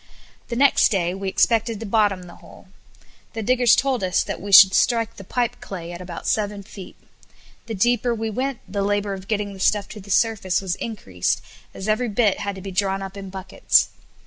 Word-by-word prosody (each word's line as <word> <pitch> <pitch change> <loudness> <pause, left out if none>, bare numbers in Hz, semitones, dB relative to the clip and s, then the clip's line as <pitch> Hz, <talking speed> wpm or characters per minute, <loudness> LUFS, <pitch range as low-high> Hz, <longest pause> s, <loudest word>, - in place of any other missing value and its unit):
The 235 - -4
next 275 +2 +4
day 180 -4 0
we 195 0 -4
expected 225 +1 +1
to 225 - -6
bottom 205 -3 +1
the 175 -1 -13
hole. - - -17 0.6
The 225 - -4
diggers 245 +1 +4
told 265 -5 0
us 185 -1 +1
that - - -6
we 200 +1 -6
should 190 0 +9
strike 230 -1 +1
the 195 - -9
pipe 245 +4 -2
clay 175 -3 -7
at 175 +1 -8
about 175 -2 -8
seven 205 -1 -1
feet. 195 -1 -11 0.7
The 225 - -4
deeper 240 +3 +1
we 225 0 -3
went, 260 +3 -3
the 200 +1 -3
labor 205 0 0
of 190 0 -8
getting 205 -2 -2
the 190 - -12
stuff 205 +1 +1
to 215 - -9
the 200 0 -14
surface 200 -3 +1
was 190 -2 -3
increased, 95 - -3 0.3
as 190 - -7
every 215 +3 +1
bit 205 -1 +1
had 200 -1 -3
to 190 - -9
be 195 +1 -7
drawn 195 +1 -1
up 195 0 -8
in 195 -1 -8
buckets. 190 0 +1
205 Hz, 205 wpm, -22 LUFS, 190-225 Hz, 0.7 s, should